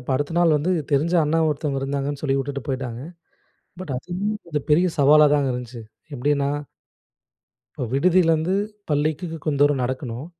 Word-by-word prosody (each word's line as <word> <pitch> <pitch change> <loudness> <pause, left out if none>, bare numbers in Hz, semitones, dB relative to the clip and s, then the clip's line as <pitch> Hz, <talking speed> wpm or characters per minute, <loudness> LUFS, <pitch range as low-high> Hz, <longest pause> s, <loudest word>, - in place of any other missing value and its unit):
இப்ப 125 - -7
அடுத்த 145 +3 -2
நாள் 170 -3 +4
வந்து 150 +5 -1 0.2
தெரிஞ்ச 155 +5 +2
அண்ணா 155 +2 +1
ஒருத்தவங்க 145 -2 -2
இருந்தாங்கன்னு, 140 +1 -3
சொல்லி 135 -2 +1
விட்டுட்டு 140 0 -4
போய்ட்டாங்க. 130 -3 -4 0.8
பட் 185 -7 -5
அதுவும் 185 +10 -3
கொஞ்சம் 150 -4 -4
பெரிய 170 +5 +4
சவாலாதாங்க 145 -1 +5
இருந்துச்சு. 125 -1 -6 0.3
எப்படின்னா 140 +1 0 1.3
இப்ப - - -4
விடுதியிலேருந்து 165 +2 +3 0.4
பள்ளிக்கு 150 +4 0 0.2
கொஞ்சம் 145 -3 -1
தூரம் 145 -2 +3
நடக்கணும். 130 +1 -4
145 Hz, 140 wpm, -23 LUFS, 135-155 Hz, 1.3 s, சவாலாதாங்க